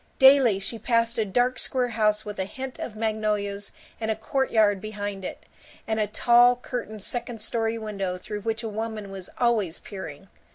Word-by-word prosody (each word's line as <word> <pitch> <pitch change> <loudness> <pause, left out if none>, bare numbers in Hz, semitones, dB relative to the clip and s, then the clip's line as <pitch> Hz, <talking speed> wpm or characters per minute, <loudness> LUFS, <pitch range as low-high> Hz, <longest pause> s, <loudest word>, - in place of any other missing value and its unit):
Daily 265 -6 +7
she 195 +4 -5
passed 230 0 +1
a 220 - +2
dark 245 +5 +1
square 250 -2 0
house 215 -2 +1
with 210 -1 -6
a 190 - 0
hint 260 +5 -7
of 220 - -5
magnolias 210 -2 -1 0.3
and 220 -1 -2
a 220 - +2
courtyard 220 -4 +2
behind 205 -2 -5
it, - - -6 0.4
and 220 0 0
a 210 - +2
tall 240 +3 +5
curtained 235 -4 -5
second 240 -1 -1
story 225 +1 0
window 195 -4 -3
through 205 +3 -6
which 225 +2 -2
a - - -2
woman 215 -1 -4
was 190 -2 -6
always 220 -8 +2
peering. 190 -4 -8
220 Hz, 175 wpm, -26 LUFS, 205-235 Hz, 0.4 s, Daily